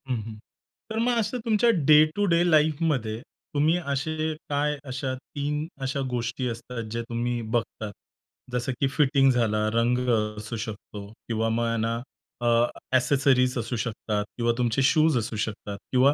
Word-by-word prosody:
हं, 125 - +1
हं, 110 0 -8 0.5
तर 220 - -3
मग 240 +1 +2
असं 230 +2 0
तुमच्या 225 +1 +3 0.2
डे 155 0 +9
टू 205 - +2
डे 170 -2 +3
लाईफमध्ये 150 -7 +2 0.3
तुम्ही 150 +3 +3 0.2
असे 155 +2 -1 0.2
काय 145 +1 0
अशा 130 0 -3
3 145 +3 -4 0.2
अशा 135 +1 -1
गोष्टी 125 +1 -2
असतात 115 +1 -5
जे 115 +1 -2
तुम्ही 120 0 -1
बघतात. 110 -1 -3 0.6
जसं 125 +1 -1
की 135 - +3
फिटिंग 135 -1 +3
झाला, 110 -3 +1
रंग 115 +2 +2 0.4
असू 110 +2 -5
शकतो 105 -2 -7 0.2
किंवा 115 -1 0
मग 115 0 0
ना 115 +1 0 0.5
अ, - - +2 0.5
एक्सेसरीज 130 0 +3
असू 120 +1 -2
शकतात 105 -2 -2
किंवा 120 -1 +2
तुमचे 120 +1 +1
शूज 155 +1 +4
असू 115 -1 -2
शकतात 105 -2 -5
किंवा 130 +2 +5
125 Hz, 155 wpm, -26 LUFS, 115-150 Hz, 0.6 s, डे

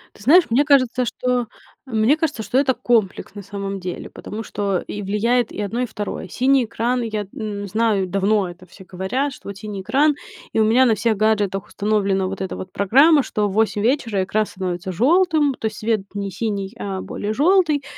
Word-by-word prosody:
Ты 205 - -15
знаешь, 335 +8 +7
мне 270 +5 +3
кажется, 255 -3 +3
что, 250 +1 -1
э, 235 - -5 0.5
мне 225 +7 +3
кажется, 295 -9 -2
что 255 - -1
это 270 -1 +3
комплекс, 230 -6 0
на 205 - -6
самом 200 0 -5
деле, 180 -1 -6
потому 220 +2 -7
что 200 -4 -1
и 205 - -5
влияет 225 +4 +1
и - - -5
одно, 225 +5 -2
и - - +1
второе, 205 -4 -5
синий 255 +5 +2
экран. 240 +3 -1
Я 215 -3 -3
н 205 -2 -4
знаю, 210 -2 +1
давно 195 0 +1
это 180 +1 -12
все 190 +2 -15
говорят, 200 +11 -2
что - - -11
вот 200 - -7
синий 205 -1 -6
экран, 290 +8 +2 0.4
и - - +1
у - - +5
меня 245 +4 +5
на 225 -3 +3
всех 220 -1 0
гаджетах 205 -3 +1
установлена 200 -2 0
вот 195 0 -5
эта 190 - -3
вот 185 - -8
программа, 275 - +5
что 210 -1 -1
в 195 - -5
8 210 -1 +1
вечера 225 -5 +1
экран 215 +3 0
становится 185 -2 -4
желтым, 305 - +3
то - - -5
есть 215 - -6
свет 220 -2 0
не 200 -1 -4
синий, 200 0 -3
а 195 -2 -4
более 210 +1 -4
желтый. 310 - +3
215 Hz, 205 wpm, -21 LUFS, 195-250 Hz, 0.5 s, знаешь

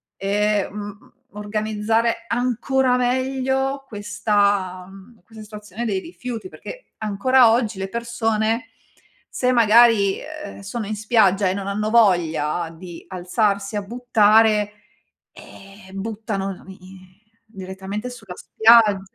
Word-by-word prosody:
e, 205 +1 0
mhmm, 205 +1 -9 0.2
organizzare 215 +2 -1
ancora 250 +2 0
meglio 265 +2 -1
questa, 205 -3 -1
mhmm, 195 +3 -16
questa 220 +2 -14
situazione 210 +1 -8
dei 195 -4 -1
rifiuti. 250 - -7
Perché - - -11
ancora 225 +4 +3
oggi 230 -3 0
le 190 0 -4
persone 230 +2 -1 0.6
se 250 0 0
magari, 230 -4 +5
ehm, 305 -7 -9
sono 210 +1 -5
in 215 - -3
spiaggia 205 -3 +2
e - - 0
non 195 0 -5
hanno 210 +2 -2
voglia 175 -7 +2
di 170 0 -11
alzarsi 200 +2 -1
a 205 - -1
buttare, 215 -2 +3 0.6
eh, 195 0 -15
buttano 200 -1 -4
la - - -16
mi 190 +1 -12 0.7
direttamente 195 +2 -7
sulla 220 -7 -10
spiagg 220 -3 +4
215 Hz, 115 wpm, -21 LUFS, 195-235 Hz, 0.7 s, magari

